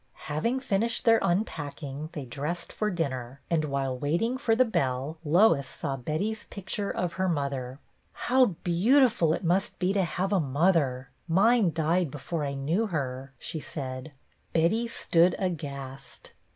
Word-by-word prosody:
Having 230 - -1
finished 230 -1 0
their 225 -1 +6
unpacking 155 -5 -2
they 150 -6 -5
dressed 150 +8 -4
for 215 - 0
dinner, 135 - -3
and, 160 -2 +2
while 135 -2 -1
waiting 170 - 0
for 250 -4 +1
the 255 +2 +5
bell, 140 - -1
Lois 165 - +4
saw 135 - -4
Betty's 165 - -3
picture 200 +1 -4
of 175 -1 -2
her 185 0 0
mother. 140 -5 -2 0.4
"How 255 +1 +3 0.2
beautiful 215 - +4
it 160 - -1
must 180 +3 +1
be 185 +1 +1
to 195 -1 +2
have 185 +4 -1
a 195 - +4
mother! 140 -4 +1 0.2
Mine 200 +3 +4
died 165 +2 +1
before 150 +3 -4
I 140 -1 -2
knew 165 +11 0
her," 135 -6 -4
she 160 - -5
said. 130 -1 -6 0.4
Betty 180 +9 +2
stood 175 -5 +3
aghast. 140 -7 -5
165 Hz, 150 wpm, -28 LUFS, 140-195 Hz, 0.4 s, their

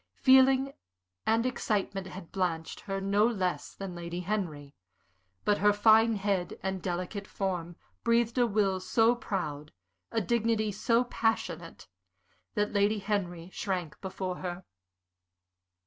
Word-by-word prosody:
Feeling 265 +1 +5 0.5
and 225 +2 +3
excitement 200 -6 -1
had 185 -2 -9
blanched 170 -4 -2
her 195 -1 -4
no 200 +2 +2
less 190 -6 -2
than 195 -2 -6
Lady 175 0 -5
Henry, 170 -8 -3 0.7
but 205 -1 +3
her 205 +1 +5
fine 220 +2 +5
head 195 -3 -1
and 190 -1 -2
delicate 185 +3 -3
form 175 -3 -3 0.3
breathed 235 +1 +2
a 240 - +4
will 200 -3 +1
so 225 +5 +3
proud, 155 - -4 0.4
a 225 - +1
dignity 225 0 +1
so 230 +4 +2
passionate, 180 - -2 0.7
that 210 0 0
Lady 205 +1 +3
Henry 190 -4 -2
shrank 180 -6 -3
before 185 -1 -4
her. 180 0 -5
195 Hz, 125 wpm, -30 LUFS, 180-220 Hz, 0.7 s, Feeling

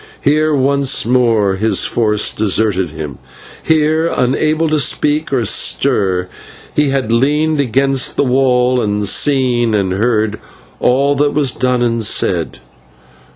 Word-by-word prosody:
Here 155 +2 +1
once 140 -1 +1
more 115 -5 +1
his 110 +3 +1
force 105 -2 +1
deserted 100 -3 0
him; 75 -4 -8 0.4
here, 160 +1 +1
unable 155 +4 0
to 155 -1 0
speak 150 +3 0
or 125 -4 0
stir, 95 -2 0 0.5
he 150 -1 +1
had 135 -4 -2
leaned 150 +6 +1
against 135 +1 0
the - - +1
wall 125 -1 +1
and 105 -1 -2
seen 120 -2 +1
and 95 -3 -1
heard 110 0 -1 0.4
all 140 +3 +1
that 145 +1 0
was 145 -4 +2
done 125 -1 -1
and 115 -1 -1
said. 105 - 0
125 Hz, 130 wpm, -14 LUFS, 110-140 Hz, 0.5 s, was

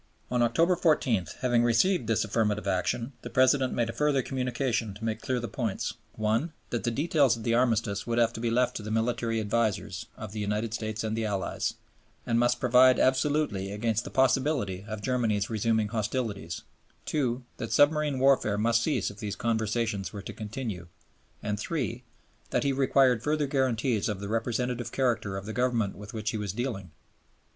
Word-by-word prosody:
On 125 -1 +2
October 165 +10 +3
14, 130 - +2
having 120 -2 +3
received 120 - +3
this 110 -1 +1
affirmative 105 -1 0
answer, 115 +6 -1
the - - -7
President 130 0 +3
made 120 -1 0
a 115 - -4
further 140 +1 +1
communication 125 -5 -1
to 110 +2 -7
make 110 -1 -2
clear 130 -1 -1
the 120 - -4
points: 115 -7 -2 0.2
(1) 110 +9 0 0.2
that 120 - -2
the 120 - +1
details 140 -2 +2
of 115 - -8
the 115 - +1
Armistice 115 -4 +1
would 120 0 0
have 115 -1 +3
to - - -6
be 115 0 0
left 125 +2 +1
to - - -6
the 105 - -6
military 115 0 0
advisers 105 -3 -1
of 110 -3 -7
the 110 - -5
United 105 +2 -1
States 110 -1 -3
and 110 0 -1
the 115 0 -1
Allies, 100 -3 -2 0.5
and 115 0 +2
must 120 0 +2
provide 125 +1 +6
absolutely 130 -7 +1
against 110 +2 0
the - - -7
possibility 130 -7 +1
of 110 -1 -6
Germany's 115 -5 0
resuming 110 -1 +1
hostilities; 105 -6 -3 0.4
(2) 125 -4 -1
that 115 -3 -5
submarine 150 -1 +3
warfare 130 -6 +3
must 115 +2 +2
cease 125 -9 0
if 100 - -14
these 105 -2 -4
conversations 110 -3 -1
were 100 -2 -7
to - - -7
continue; 105 -5 -5 0.6
and 105 -1 -2
(3) 125 -4 -3 0.5
that - - +1
he 140 -1 +1
required 130 -3 +3
further 150 +2 +1
guarantees 130 -5 0
of 105 -3 -3
the 100 - -5
representative 120 +2 -1
character 115 -7 0
of 95 - -6
the 110 - -5
Government 120 -5 0
with 105 +1 -9
which 110 -1 -3
he 110 - -3
was 105 -3 -3
dealing. 110 -6 -3
115 Hz, 185 wpm, -28 LUFS, 105-130 Hz, 0.6 s, provide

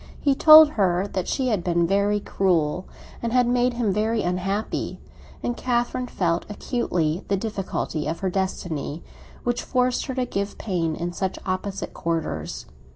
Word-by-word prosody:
He 280 - +3
told 310 +2 +9
her 190 -5 +1
that 185 - -2
she 260 -1 0
had 205 -7 0
been 170 -1 +2
very 200 +3 +2
cruel, 180 -4 0 0.3
and 235 - -2
had 250 0 +4
made 245 0 +2
him 225 -5 +1
very 220 +2 0
unhappy; 190 +4 -2 0.4
and 240 - -1
Catherine 245 +1 -1
felt 170 -6 0
acutely 180 - -1
the 200 - +1
difficulty 190 -7 -3
of 165 +2 -3
her 190 - 0
destiny, 170 -5 -3 0.4
which 245 0 0
forced 250 -1 0
her 260 - -3
to 255 -1 0
give 200 -4 -3
pain 170 -6 -1
in 175 +2 -4
such 190 +1 -2
opposite 190 +1 -3
quarters. 165 -1 -3
195 Hz, 160 wpm, -24 LUFS, 175-240 Hz, 0.4 s, told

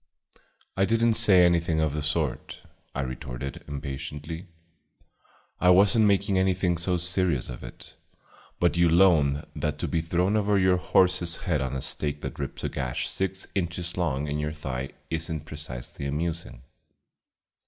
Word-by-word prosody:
"I 95 - +3
did 115 +3 +2
n't 115 -1 +3
say 95 -6 +6
anything 85 -2 +2
of 80 -2 +1
the 75 - -2
sort," 75 -2 -2 0.3
I 70 - -1
retorted 65 0 -6
impatiently. 75 +4 -6 1.1
"I 90 - +4
was 95 +3 +6
n't 110 -1 +5
making 100 -1 +2
anything 90 -2 +1
so 90 +1 +1
serious 90 -6 0
of - - -8
it; - - -10 0.6
but 85 0 +2
you'll 85 +1 +5
own 75 -6 +3
that 75 -1 -2
to - - -3
be 80 - 0
thrown 90 +5 +1
over 105 -1 +2
your 95 -1 +4
horse's 90 -1 +2
head 75 -5 +1
on 65 0 -2
a 65 - -3
stake 75 +1 -2
that - - -6
rips 70 - -5
a - - -1
gash 65 -3 -3
six 95 0 -2
inches 85 -2 -3
long 75 -5 -1
in 75 +1 -2
your 75 +1 -2
thigh 65 -3 -5 0.2
is 80 0 -2
n't 80 -1 -4
precisely 70 -3 -7
amusing." 80 -2 -4
85 Hz, 165 wpm, -26 LUFS, 70-90 Hz, 1.1 s, say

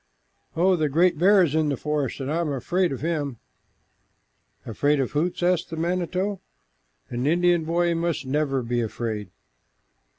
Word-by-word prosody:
"Oh, 185 +2 +4
the 155 -3 0
great 170 +2 +2
bear 195 +2 +6
is 155 -5 0
in 155 -1 +2
the 140 - -1
forest, 150 -3 -2
and 135 +1 -3
I 165 - 0
am 160 -3 -1
afraid 175 +7 0
of 135 - -5
him!" 150 -6 -2 1.3
"Afraid 145 +6 +1
of 135 - -1
Hoots?" 170 +4 -1
asked 180 -1 +1
the 165 - -6
manito. 185 +3 -1 0.7
"An 125 +3 -1
Indian 175 0 +3
boy 170 +1 +1
must 165 -3 -2
never 135 -1 0
be 120 +1 -1
afraid." 110 -2 -4
155 Hz, 160 wpm, -24 LUFS, 135-175 Hz, 1.3 s, bear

